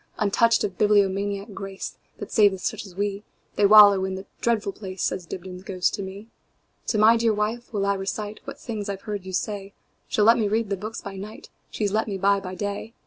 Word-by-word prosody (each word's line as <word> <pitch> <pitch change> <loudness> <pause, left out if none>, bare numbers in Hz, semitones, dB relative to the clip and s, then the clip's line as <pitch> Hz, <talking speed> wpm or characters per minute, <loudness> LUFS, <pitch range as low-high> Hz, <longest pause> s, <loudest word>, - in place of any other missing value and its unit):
Untouched 225 +3 +3
of 195 -3 -3
bibliomaniac 200 0 +2
grace, 195 0 -6 0.2
That - - -8
saveth 200 -4 +4
such 205 - -3
as 180 - -14
we, 200 +1 -2 0.3
They 205 - +4
wallow 205 -2 +8
in 190 0 -2
that 190 +1 -7 0.2
dreadful 220 -4 +1
place,"Says 185 -3 -4
Dibdin's 180 +1 -7
ghost 185 -2 -1
to - - -3
me."To 200 +3 -8
my 220 +2 +6
dear 225 -2 +2
wife 220 +3 -2
will 200 -3 -1
I 200 0 +2
reciteWhat 205 +2 -5
things 215 -4 -5
I 200 - -1
've 195 - -16
heard 205 -4 -5
you - - -5
say; 200 0 -3 0.3
She - - -2
'll 210 - +5
let 230 +2 +6
me 215 - +1
read 215 0 -1
the - - +2
books 215 +4 -6
by 195 -1 -8
nightShe 210 +3 -9 0.4
's 200 - 0
let 220 +2 0
me 200 -2 -3
buy 200 +1 +3
by 185 -1 -7
day. 205 +3 -5
200 Hz, 210 wpm, -24 LUFS, 195-215 Hz, 0.4 s, wallow